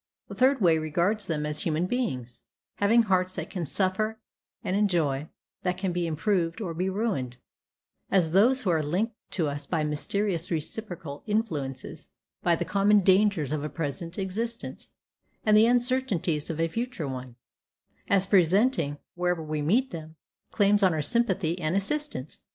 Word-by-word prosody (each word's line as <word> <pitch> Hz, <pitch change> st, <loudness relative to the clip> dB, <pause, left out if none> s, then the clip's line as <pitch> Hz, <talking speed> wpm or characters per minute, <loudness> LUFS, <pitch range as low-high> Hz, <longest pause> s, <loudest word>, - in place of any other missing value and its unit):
A -, -, -4 dB
third 260 Hz, 0 st, +3 dB
way 165 Hz, -4 st, +4 dB
regards 175 Hz, +7 st, 0 dB
them 150 Hz, -3 st, -1 dB
as 150 Hz, 0 st, -2 dB
human 160 Hz, +2 st, 0 dB
beings, 130 Hz, -, -3 dB, 0.4 s
having 225 Hz, +4 st, +4 dB
hearts 185 Hz, -3 st, +1 dB
that -, -, -5 dB
can 175 Hz, -5 st, -3 dB
suffer 205 Hz, +6 st, 0 dB, 0.5 s
and 185 Hz, -, -1 dB
enjoy, 160 Hz, -8 st, +1 dB, 0.3 s
that 180 Hz, -1 st, -1 dB
can 190 Hz, -1 st, -1 dB
be 175 Hz, -1 st, -1 dB
improved 165 Hz, +2 st, 0 dB
or 185 Hz, -7 st, -3 dB
be 180 Hz, +3 st, -1 dB
ruined; 190 Hz, -, -2 dB, 0.7 s
as 180 Hz, -5 st, +2 dB
those 240 Hz, +8 st, +4 dB
who 185 Hz, -, +2 dB
are 160 Hz, -2 st, +2 dB
linked 185 Hz, +10 st, -1 dB, 0.2 s
to 165 Hz, -5 st, -1 dB
us 145 Hz, 0 st, -5 dB
by 160 Hz, -3 st, 0 dB
mysterious 170 Hz, +4 st, -1 dB
reciprocal 165 Hz, -3 st, -4 dB
influences, 165 Hz, -, -3 dB, 0.3 s
by 170 Hz, -, +3 dB
the 175 Hz, -, -3 dB
common 200 Hz, +3 st, +4 dB
dangers 190 Hz, -6 st, +3 dB
of 150 Hz, -1 st, -1 dB
a 150 Hz, -, -3 dB
present 165 Hz, +3 st, -5 dB
existence, 225 Hz, +5 st, -4 dB, 0.6 s
and 215 Hz, -1 st, +5 dB
the 220 Hz, +2 st, +7 dB
uncertainties 240 Hz, -, +1 dB
of 160 Hz, -1 st, -4 dB
a 165 Hz, -, +2 dB
future 230 Hz, -, -3 dB
one; 130 Hz, -2 st, -6 dB, 0.7 s
as 195 Hz, -1 st, +3 dB
presenting, 185 Hz, -, +3 dB, 0.2 s
wherever 180 Hz, -2 st, -1 dB
we 155 Hz, -1 st, -3 dB
meet 230 Hz, -, +2 dB
them, 160 Hz, -1 st, -8 dB, 0.3 s
claims 205 Hz, 0 st, +3 dB
on 185 Hz, -4 st, +4 dB
our 155 Hz, -, -1 dB
sympathy 190 Hz, -3 st, +1 dB
and 155 Hz, +1 st, -1 dB
assistance. 200 Hz, -, -3 dB
180 Hz, 160 wpm, -27 LUFS, 155-210 Hz, 0.7 s, the